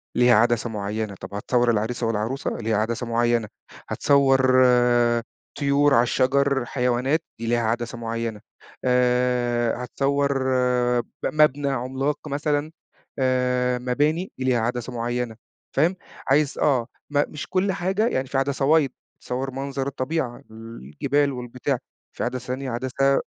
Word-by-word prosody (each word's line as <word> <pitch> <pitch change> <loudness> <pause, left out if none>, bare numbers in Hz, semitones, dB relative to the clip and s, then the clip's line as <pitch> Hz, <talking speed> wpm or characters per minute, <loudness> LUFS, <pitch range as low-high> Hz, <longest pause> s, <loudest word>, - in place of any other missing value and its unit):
ليها 120 -1 +5
عدسة 120 +1 +2
معيّنة، 105 -1 -3
طب 95 - -8
هتصور 120 +4 +1
العريس 115 +3 -1
والعروسة 115 +4 -1
ليها 110 -2 0
عدسة 115 +2 -1
معيّنة، 115 -1 +1 0.4
هتصوّر 135 -2 +3 1.1
طيورعلى 140 -3 +4
الشجر، 135 +1 +1
حيوانات 125 +5 0 0.2
دي 115 - -4
ليها 120 0 +2
عدسة 120 +1 -2
معيّنة، 115 -2 -4 0.4
آآ، 125 -1 +1
هتصوَّر 140 +1 0 0.6
ب - - -20 0.2
مبنى 145 -2 +3
عملاق 135 +4 -2
مثلًا 145 +2 -1 0.5
آآ، 125 -1 +1
مباني، 150 +8 0
دي 130 - -4
ليها 125 -2 +2
عدسة 120 +2 -2
معيّنة، 120 -1 -2 0.4
فاهم؟ 165 +7 +3 0.3
عايز 145 +1 +2
آه، 130 -5 +2 0.2
م 145 0 +2
مش 150 - -6
كل 190 +1 +1
حاجة 190 +5 0
يعني 130 - -1
في 135 - -2
عدسة 140 +2 +2
wide - - -22 0.3
تصوّر 130 +2 -3
منظر 135 0 -3
الطبيعة، 130 -2 -3
الجبال 115 - -2
والبتاع، 125 +2 -3 0.4
في - - -2
عدسة 125 0 -3
تانية 130 0 -3
عدسة 130 +3 +1
125 Hz, 130 wpm, -24 LUFS, 120-140 Hz, 1.1 s, ليها